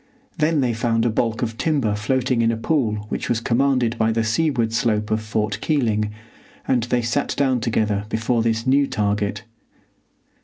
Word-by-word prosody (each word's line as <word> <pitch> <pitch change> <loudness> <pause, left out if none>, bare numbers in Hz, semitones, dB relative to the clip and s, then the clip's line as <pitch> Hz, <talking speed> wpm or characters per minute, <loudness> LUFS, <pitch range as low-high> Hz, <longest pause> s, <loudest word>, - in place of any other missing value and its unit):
Then 155 -1 +2
they 125 -3 +1
found 115 0 0
a 120 - +2
balk 115 +1 -1
of 115 -1 -4
timber 140 -10 +1
floating 125 +3 0
in 115 0 +3
a 115 - -2
pool 115 -6 0
which - - -3
was 120 - +1
commanded 120 -1 +1
by 110 0 +2
the 115 0 0
seaward 115 -1 0
slope 110 -2 0
of 110 0 +1
Fort 105 -1 -2
Keeling, 110 -9 +1 0.6
and 125 -2 +2
they 120 0 0
sat 120 +5 -1
down 135 -3 +2
together 110 -3 0
before 115 +1 0
this 115 0 0
new 140 +2 +3
target. 105 0 -1
115 Hz, 170 wpm, -22 LUFS, 110-130 Hz, 0.6 s, in